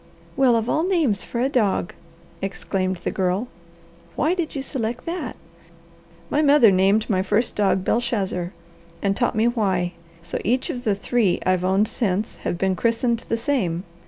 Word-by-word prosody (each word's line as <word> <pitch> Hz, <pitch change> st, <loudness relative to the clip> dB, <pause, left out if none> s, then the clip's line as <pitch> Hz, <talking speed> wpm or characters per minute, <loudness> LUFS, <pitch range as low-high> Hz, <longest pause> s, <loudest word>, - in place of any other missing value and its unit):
"Well 260 Hz, -3 st, +4 dB
of 225 Hz, 0 st, 0 dB
all 310 Hz, -, +1 dB
names 325 Hz, -, +1 dB
for 235 Hz, -, -4 dB
a 260 Hz, -, +3 dB
dog!" 215 Hz, -9 st, 0 dB, 0.5 s
exclaimed 185 Hz, -1 st, -2 dB
the -, -, -1 dB
Girl. 190 Hz, +5 st, 0 dB, 0.7 s
"Why 310 Hz, +6 st, +2 dB
did 340 Hz, -4 st, -3 dB
you 275 Hz, -, -2 dB
select 245 Hz, -4 st, -3 dB
that?" 345 Hz, +2 st, -4 dB, 1.0 s
"My 295 Hz, -, +3 dB
mother 285 Hz, -7 st, +6 dB
named 195 Hz, +3 st, +3 dB
my 185 Hz, -3 st, +1 dB
first 210 Hz, +5 st, +1 dB
dog 195 Hz, -2 st, +2 dB
Belshazzar, 200 Hz, -7 st, -1 dB, 0.5 s
and 200 Hz, -1 st, +1 dB
taught 240 Hz, +1 st, 0 dB
me 220 Hz, +2 st, +3 dB
why; 190 Hz, -7 st, 0 dB, 0.3 s
so -, -, -4 dB
each 250 Hz, +5 st, 0 dB
of 245 Hz, 0 st, -7 dB
the 210 Hz, -3 st, +2 dB
three 210 Hz, -2 st, +1 dB
I've 185 Hz, -1 st, +2 dB
owned 190 Hz, +3 st, +2 dB
since 210 Hz, -2 st, -2 dB
have 170 Hz, -, -3 dB
been 190 Hz, +1 st, +1 dB
christened 230 Hz, +3 st, +1 dB
the 230 Hz, -, +1 dB
same. 210 Hz, -9 st, -1 dB
220 Hz, 165 wpm, -23 LUFS, 190-245 Hz, 1.0 s, mother